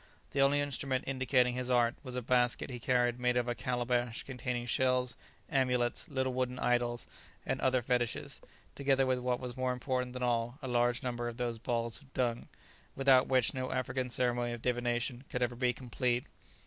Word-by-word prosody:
The 140 - +1
only 140 +1 +4
instrument 135 -2 -1
indicating 130 -2 +2
his 125 0 -2
art 120 -1 +4
was 130 -2 -7
a 125 - -2
basket 125 +2 +2
he 125 - -5
carried 120 0 +2
made 125 0 +2
of 120 0 +1
a 120 - +1
calabash 120 -1 -1
containing 125 -2 -3
shells, 125 0 +1 0.3
amulets, 125 -3 0
little 130 -2 0
wooden 125 0 -1
idols 120 -1 +1 0.4
and - - -1
other 130 -1 +2
fetishes, 120 -1 -1 0.3
together 135 -1 +2
with 130 -1 +1
what 125 0 0
was 125 -2 -5
more 130 -1 0
important 125 0 -2
than 125 0 -4
all, 120 +1 0
a - - -3
large 120 +1 +1
number 120 -1 -2
of 120 -1 -5
those 120 -2 -2
balls 115 +2 -1
of 135 -2 -20
dung, 120 -2 0 0.5
without 135 -1 +5
which 130 -3 +3
no 130 0 -3
African 130 0 -1
ceremony 120 -1 0
of 120 - -7
divination 120 0 -1
could 125 - -1
ever 120 0 -1
be 125 0 +2
complete. 125 0 -1
125 Hz, 185 wpm, -32 LUFS, 120-130 Hz, 0.5 s, without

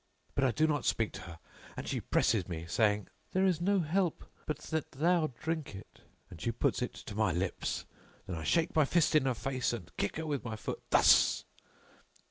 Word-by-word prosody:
But 135 - 0
I - - +4
do 155 +6 +2
not 150 -2 0
speak 115 -2 +1
to - - -8
her 85 -4 -10 0.4
and - - -5
she - - -2
presses 105 -5 +1
me, 85 -2 -5
saying, 105 +3 +1 0.3
'There 185 +1 +3
is 180 -3 +2
no 195 +1 +3
help 175 +2 0 0.2
but 155 -3 -1
that 160 0 -4
thou 165 +3 +2
drink 160 -8 -3
it;' 95 - -12 0.3
and - - -12
she - - 0
puts - - 0
it - - -3
to - - -8
my 105 -2 +2
lips. 90 +3 -2 0.4
Then 90 - -4
I 80 - -5
shake 165 - +1
my 155 - +6
fist 165 +3 +2
in 150 -3 +4
her 130 - +1
face 130 0 -1
and 90 -6 -7
kick 100 - -1
her 160 - -3
with 145 -3 -2
my 115 -2 -4
foot 110 - -5
thus." - - +5
135 Hz, 210 wpm, -32 LUFS, 105-160 Hz, 0.4 s, my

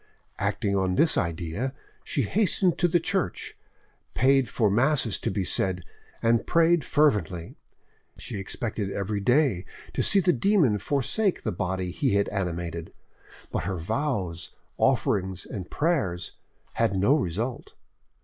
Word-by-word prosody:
Acting 100 -1 0
on 95 -1 +1
this 160 - +4
idea, 85 - -2 0.3
she 140 - -1
hastened 185 - +2
to 175 - +4
the 175 +1 +2
church, 190 +2 -2 0.6
paid 135 0 +3
for 110 -4 +1
masses 125 0 +2
to - - -2
be 95 0 -1
said, 90 -1 +1 0.4
and 115 0 +2
prayed 165 0 +4
fervently. 100 - +1 0.6
She 100 - -6
expected 100 0 -4
every 100 +1 -2
day 125 - +2 0.3
to - - 0
see 200 - +4
the 180 -1 +3
demon 175 - +3
forsake 175 - 0
the - - -1
body 90 +1 -2
he 120 +3 0
had 100 - +2
animated, 85 -4 -4 0.6
but - - -2
her 95 -2 -2
vows, 95 - -2 0.3
offerings, 95 -2 +1
and 95 -4 -7
prayers 135 - -1 0.4
had 95 - +1
no 100 +10 +4
result. 120 - -3
105 Hz, 135 wpm, -26 LUFS, 95-145 Hz, 0.6 s, this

